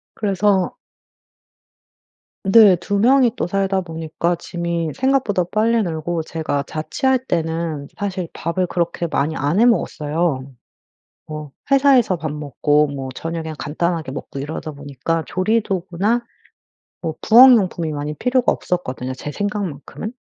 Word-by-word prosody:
그래서 200 Hz, -2 st, +1 dB, 1.7 s
네. 195 Hz, -1 st, +7 dB
2 200 Hz, +4 st, -2 dB
명이 250 Hz, +1 st, +5 dB
또 -, -, -1 dB
살다 195 Hz, 0 st, 0 dB
보니까 165 Hz, 0 st, -2 dB
짐이 170 Hz, -2 st, -3 dB
생각보다 260 Hz, -9 st, +1 dB
빨리 225 Hz, +2 st, +2 dB
늘고 165 Hz, -1 st, -2 dB
제가 155 Hz, -3 st, -2 dB
자취할 260 Hz, -, 0 dB
때는 160 Hz, -, -2 dB
사실 190 Hz, -4 st, -3 dB
밥을 175 Hz, +2 st, -2 dB
그렇게 170 Hz, 0 st, -1 dB
많이 155 Hz, +2 st, 0 dB
안 145 Hz, +7 st, 0 dB
해 235 Hz, -, +6 dB
먹었어요. 155 Hz, -, 0 dB, 0.8 s
뭐 155 Hz, -1 st, -7 dB, 0.2 s
회사에서 270 Hz, -8 st, +4 dB
밥 155 Hz, -3 st, -4 dB
먹고 150 Hz, 0 st, +1 dB
뭐 135 Hz, -2 st, -5 dB
저녁에 165 Hz, 0 st, -4 dB
간단하게 160 Hz, -1 st, -2 dB
먹고 140 Hz, -, -7 dB
이러다 155 Hz, +2 st, -5 dB
보니까 145 Hz, +3 st, -3 dB
조리도구나 200 Hz, +2 st, 0 dB, 0.8 s
뭐 160 Hz, -2 st, -2 dB
부엌 250 Hz, +4 st, +8 dB
용품이 175 Hz, -6 st, -1 dB
많이 150 Hz, +1 st, -4 dB
필요가 250 Hz, -, +2 dB
없었거든요 130 Hz, -7 st, -3 dB
제 140 Hz, +3 st, -6 dB
생각만큼은. 205 Hz, -, -4 dB
170 Hz, 280 characters per minute, -20 LUFS, 155-205 Hz, 1.7 s, 부엌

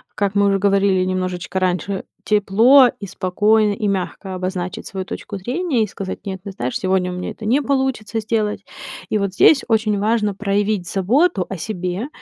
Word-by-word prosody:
как 200 Hz, -1 st, 0 dB
мы 200 Hz, 0 st, +4 dB
уже 195 Hz, 0 st, +2 dB
говорили 195 Hz, -1 st, +3 dB
немножечко 185 Hz, 0 st, -2 dB
раньше: 185 Hz, +1 st, -1 dB, 0.2 s
тепло, 225 Hz, +6 st, +5 dB
и 200 Hz, -, -6 dB
спокойно, 205 Hz, +3 st, +2 dB
и 210 Hz, +1 st, -2 dB
мягко 190 Hz, 0 st, -3 dB
обозначить 185 Hz, -1 st, -4 dB
свою 190 Hz, -1 st, -5 dB
точку 200 Hz, +1 st, -6 dB
зрения 255 Hz, -, -1 dB
и 215 Hz, -, -2 dB
сказать: 190 Hz, 0 st, -7 dB
"Нет, 190 Hz, -1 st, -4 dB
ты 200 Hz, -, -6 dB
знаешь, 125 Hz, -9 st, -4 dB
сегодня 185 Hz, -1 st, 0 dB
у -, -, -5 dB
меня 180 Hz, -, -4 dB
это 220 Hz, -, -9 dB
не 255 Hz, +7 st, +2 dB
получится 265 Hz, -5 st, -1 dB
сделать". 215 Hz, -2 st, -1 dB, 0.5 s
И 215 Hz, -, +1 dB
вот 200 Hz, -2 st, -2 dB
здесь 275 Hz, +8 st, +5 dB
очень 215 Hz, -3 st, +1 dB
важно 215 Hz, -1 st, +1 dB
проявить 200 Hz, -2 st, -1 dB
заботу 205 Hz, -, +2 dB
о 195 Hz, -, -4 dB
себе 185 Hz, -, -3 dB
200 Hz, 175 wpm, -20 LUFS, 185-220 Hz, 0.5 s, тепло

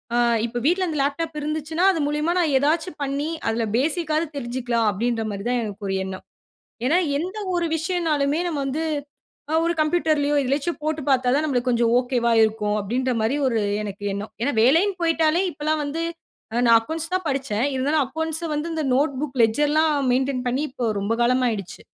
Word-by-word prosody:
ஆ -, -, +2 dB, 0.3 s
இப்ப 240 Hz, +1 st, -3 dB
வீட்ல 365 Hz, +3 st, +2 dB
அந்த 310 Hz, -, -3 dB
லேப்டாப் 305 Hz, +3 st, -2 dB
இருந்துச்சுன்னா, 310 Hz, +3 st, -2 dB
அது 330 Hz, -, -2 dB
மூலியமா 300 Hz, +3 st, 0 dB
நான் 320 Hz, -5 st, +2 dB
ஏதாச்சு 315 Hz, +6 st, +1 dB
பண்ணி 280 Hz, +2 st, -1 dB, 0.2 s
அதுல 225 Hz, +1 st, 0 dB
பேசிக்காது 310 Hz, +2 st, 0 dB
தெரிஞ்சுக்கலாம் 240 Hz, -3 st, -1 dB
அப்டின்ற 225 Hz, +3 st, -1 dB
மாரி 200 Hz, 0 st, -5 dB
தான் 245 Hz, 0 st, +1 dB
எனக்கு 205 Hz, -1 st, -6 dB
ஒரு 195 Hz, -, -1 dB
எண்ணம். 190 Hz, 0 st, -6 dB, 0.6 s
ஏனா 315 Hz, +7 st, +3 dB, 0.2 s
எந்த 370 Hz, +6 st, -4 dB, 0.2 s
ஒரு 345 Hz, -1 st, 0 dB
விஷயம்ன்னாலுமே 320 Hz, -4 st, 0 dB
நம்ம 305 Hz, -5 st, -2 dB
வந்து 290 Hz, +4 st, -2 dB, 0.7 s
அ -, -, 0 dB
ஒரு 340 Hz, -, +1 dB
கம்ப்யூட்டர்லயோ, 305 Hz, -2 st, +1 dB
எதிலயாச்சு 280 Hz, +6 st, 0 dB
போட்டு 310 Hz, 0 st, -1 dB
பார்த்தா 255 Hz, -2 st, +3 dB
தான் 305 Hz, +2 st, +1 dB
நம்ளுக்கு 255 Hz, -3 st, 0 dB
கொஞ்சம் 235 Hz, -1 st, +2 dB
ஓகேவா 245 Hz, -2 st, 0 dB
இருக்கும். 215 Hz, -1 st, 0 dB
அப்டின்ற 250 Hz, +5 st, -1 dB
மாரி 225 Hz, +6 st, +1 dB
எனக்கு 270 Hz, -, +2 dB, 0.6 s
ஒரு 205 Hz, -, 0 dB
எண்ணம். 205 Hz, +2 st, -5 dB
ஏனா, 285 Hz, -, +1 dB
வேலைன் 330 Hz, -, +4 dB
போயிட்டாலே 330 Hz, +1 st, +2 dB
இப்பொல்லாம் 305 Hz, +1 st, -1 dB
வந்து 320 Hz, +4 st, -3 dB, 0.5 s
அ -, -, +1 dB
நான் 230 Hz, -, +7 dB
அக்கவுண்ட்ஸ் 320 Hz, +8 st, -5 dB
தான் 370 Hz, -, -2 dB
படிச்சேன். 265 Hz, -3 st, -1 dB
இருந்தாலும் 285 Hz, +3 st, +2 dB
அக்கவுண்ட்ஸ 320 Hz, +4 st, -2 dB
வந்து 300 Hz, +3 st, -2 dB
இந்த 315 Hz, -, -2 dB
நோட்புக் 280 Hz, -1 st, -1 dB
லெட்ஜர்லாம் 295 Hz, +6 st, +2 dB, 0.2 s
மெயின்டென் 260 Hz, 0 st, 0 dB
பண்ணி 260 Hz, +3 st, -1 dB
இப்போ 250 Hz, -3 st, -3 dB
ரொம்ப 205 Hz, +3 st, -1 dB
காலமாயிடுச்சு. 235 Hz, -6 st, 0 dB
285 Hz, 170 wpm, -23 LUFS, 240-315 Hz, 0.7 s, நான்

